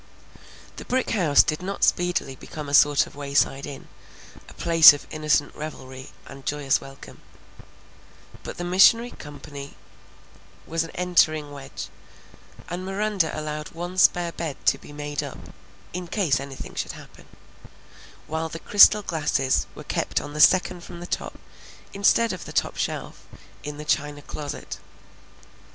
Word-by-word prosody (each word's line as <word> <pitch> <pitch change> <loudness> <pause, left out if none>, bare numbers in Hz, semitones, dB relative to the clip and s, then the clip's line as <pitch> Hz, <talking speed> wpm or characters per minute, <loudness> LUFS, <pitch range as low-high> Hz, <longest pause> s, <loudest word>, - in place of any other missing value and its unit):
The - - -8
brick 255 0 -1
house 165 -9 +4
did 155 - -2
not 195 +2 -4
speedily 175 -6 +1
become 150 +3 -9
a 140 - -6
sort 145 0 +5
of - - -15
wayside 140 -1 0
inn, 140 -2 -9 0.6
a - - -13
place 165 -3 +8
of 145 - -8
innocent 150 -1 +1
revelry 130 -3 -8 0.2
and 135 0 -12
joyous 145 -1 0
welcome; 135 0 -13 1.2
but - - -8
the 175 - -4
missionary 195 +7 +5
company 145 -1 -10 0.9
was 165 0 -1
an 165 - -8
entering 155 -4 +2
wedge, 140 -1 -8 0.8
and 175 +2 -5
Miranda 195 -2 0
allowed 150 0 -5
one 175 +2 -6
spare 175 -1 +4
bed 160 -4 -5
to 135 - +3
be - - -13
made 145 -1 -4
up - - -7 0.6
"in 180 0 -5
case 170 -7 +1
anything 140 -1 -8
should - - -4
happen," - - -14 1.0
while 160 +1 -3
the 165 - -6
crystal 205 +3 +6
glasses 145 -6 0
were - - -9
kept - - -1
on 145 - -8
the 150 - 0
second 180 0 +4
from 170 - -10
the 175 - -7
top, - - -4 0.6
instead 215 +3 +3
of - - -8
the - - -8
top - - 0
shelf, - - -5 0.4
in 150 0 -6
the 150 - -8
china 145 -1 -1
closet. 145 0 -7
155 Hz, 150 wpm, -24 LUFS, 145-175 Hz, 1.2 s, place